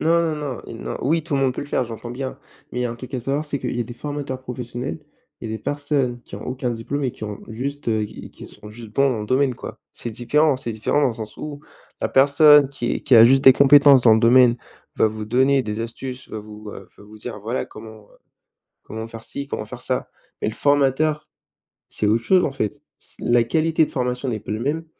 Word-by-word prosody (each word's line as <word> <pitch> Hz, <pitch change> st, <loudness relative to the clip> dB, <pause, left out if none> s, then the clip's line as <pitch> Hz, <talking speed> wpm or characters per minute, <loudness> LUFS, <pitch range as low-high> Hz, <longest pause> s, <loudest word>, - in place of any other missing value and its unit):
non, 165 Hz, +1 st, +3 dB
non, 160 Hz, -2 st, -1 dB
non, 130 Hz, -3 st, -5 dB
i -, -, -8 dB
non, -, -, -5 dB
oui, 160 Hz, +3 st, +1 dB
tout 160 Hz, -4 st, -2 dB
le 135 Hz, -, +1 dB
monde 130 Hz, -2 st, +2 dB
peut -, -, -5 dB
le 145 Hz, -, -6 dB
faire, 145 Hz, -, 0 dB
j'entends 120 Hz, 0 st, -7 dB
bien, 130 Hz, +1 st, -5 dB, 0.3 s
mais 125 Hz, -, -5 dB
il -, -, +1 dB
y -, -, 0 dB
a 120 Hz, -, -1 dB
un -, -, -5 dB
truc 130 Hz, +3 st, -10 dB
à 125 Hz, -, -2 dB
savoir 140 Hz, +5 st, -2 dB
c'est 145 Hz, -2 st, -3 dB
qu'il 125 Hz, -1 st, -4 dB
y -, -, -1 dB
a -, -, +2 dB
des 120 Hz, +1 st, -9 dB
formateurs 145 Hz, -2 st, -5 dB
professionnels, 125 Hz, +3 st, -6 dB, 0.4 s
il 110 Hz, -, -6 dB
y -, -, -3 dB
a -, -, -2 dB
des -, -, -10 dB
personnes 145 Hz, -4 st, -1 dB
qui -, -, -10 dB
ont -, -, -9 dB
aucun 125 Hz, -1 st, -2 dB
diplôme 120 Hz, +5 st, -3 dB
et 130 Hz, -, 0 dB
qui 110 Hz, -, -9 dB
ont 105 Hz, -1 st, -6 dB
juste, 135 Hz, +4 st, -5 dB
heu, 110 Hz, -1 st, +1 dB
qui -, -, -10 dB
qui -, -, -12 dB
sont 105 Hz, -, -13 dB
juste 115 Hz, -1 st, -11 dB
bons 140 Hz, +2 st, +3 dB
dans 115 Hz, -, -2 dB
le -, -, -6 dB
domaine, 130 Hz, 0 st, +1 dB
quoi. -, -, -8 dB, 0.2 s
C'est 120 Hz, -, -6 dB
différent! 145 Hz, +5 st, +2 dB
C'est 120 Hz, -2 st, -5 dB
différent 110 Hz, +6 st, 0 dB
dans 140 Hz, -, +3 dB
le 115 Hz, -, -4 dB
sens 110 Hz, -2 st, -8 dB
où 145 Hz, -1 st, -7 dB, 0.4 s
la -, -, 0 dB
personne 145 Hz, +1 st, +6 dB
qui 130 Hz, -4 st, -3 dB
qui 125 Hz, -, +5 dB
a 115 Hz, -, +10 dB
juste 135 Hz, +3 st, +5 dB
des 130 Hz, -, +9 dB
compétences 140 Hz, -1 st, +7 dB
dans 115 Hz, -2 st, +7 dB
le 110 Hz, -, +2 dB
domaine 120 Hz, 0 st, +6 dB, 0.4 s
va 110 Hz, -, +3 dB
vous 110 Hz, 0 st, -6 dB
donner 130 Hz, +4 st, +3 dB
des 105 Hz, +1 st, -4 dB
astuces, 125 Hz, +2 st, -6 dB
va 110 Hz, -, -6 dB
vous, 105 Hz, 0 st, -10 dB
heu, 95 Hz, -, -11 dB
va -, -, -16 dB
vous 105 Hz, +1 st, -14 dB
dire 110 Hz, -1 st, -7 dB
voilà, 115 Hz, +5 st, -2 dB
comment, 110 Hz, 0 st, -12 dB
heu, -, -, -23 dB, 0.7 s
comment 110 Hz, +1 st, -7 dB
faire-ci, 115 Hz, +5 st, -7 dB
comment -, -, -4 dB
faire-ça. -, -, -4 dB, 0.3 s
Mais -, -, 0 dB
le -, -, -7 dB
formateur, 145 Hz, +3 st, +1 dB, 0.6 s
c'est 105 Hz, -, -1 dB
autre 115 Hz, +2 st, +2 dB
chose 185 Hz, -1 st, +4 dB
en 140 Hz, -, -3 dB
fait, 135 Hz, +3 st, -3 dB, 0.2 s
c' -, -, -17 dB
la 120 Hz, 0 st, +3 dB
qualité 160 Hz, +5 st, +2 dB
de -, -, -12 dB
formation 125 Hz, 0 st, -2 dB
n'est 110 Hz, -3 st, -2 dB
pas 105 Hz, -, -8 dB
le 110 Hz, -, -4 dB
même 155 Hz, +6 st, -2 dB
125 Hz, 255 wpm, -22 LUFS, 115-140 Hz, 0.7 s, a